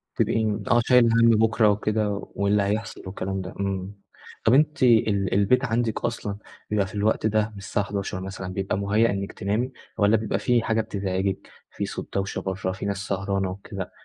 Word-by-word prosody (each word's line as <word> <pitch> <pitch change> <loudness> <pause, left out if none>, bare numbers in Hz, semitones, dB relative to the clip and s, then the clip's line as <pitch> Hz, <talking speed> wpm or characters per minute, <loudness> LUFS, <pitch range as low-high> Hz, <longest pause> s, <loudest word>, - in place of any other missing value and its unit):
تبقي 110 -2 +1
آه، 120 0 +5
شايلة 125 -2 +6
همّ 115 - +6
بكرة 110 -1 +4
وكده، 105 +1 +1 0.3
واللي 100 0 +2
هيحصل 105 +1 -2
والكلام 95 0 -3
ده، 90 - -7
إمم. 100 0 -3 0.5
طب 115 - +5
أنتِ 150 0 +3
ال 110 -5 +3
البيت 115 +7 +3
عندكِ 115 -1 -1
أصلًا 100 -1 -3 0.3
بيبقى 100 -2 +1
في - - -11
الوقت 105 +1 +1
ده 110 0 +2
من 105 - -13
الساعة 100 +1 -2
23:00 100 -2 -4
مثلًا، 95 -1 -6
بيبقى 95 0 -1
مُهيّأ 105 +3 +2
إنكِ 100 0 -3
تنامي؟ 110 +7 -1 0.3
والَّا 105 +2 +4
بيبقى 110 -1 -2
في 120 -2 +2
حاجة 110 0 +1
بتزعجكِ، 95 -2 -2 0.2
في - - -3
صوت - - -7
دوشة 100 0 -1
برّه، 95 0 -2
في 95 - -6
ناس 100 -1 -1
سهرانة 95 -1 -1
وكده، 95 0 -7
100 Hz, 180 wpm, -25 LUFS, 95-110 Hz, 0.5 s, شايلة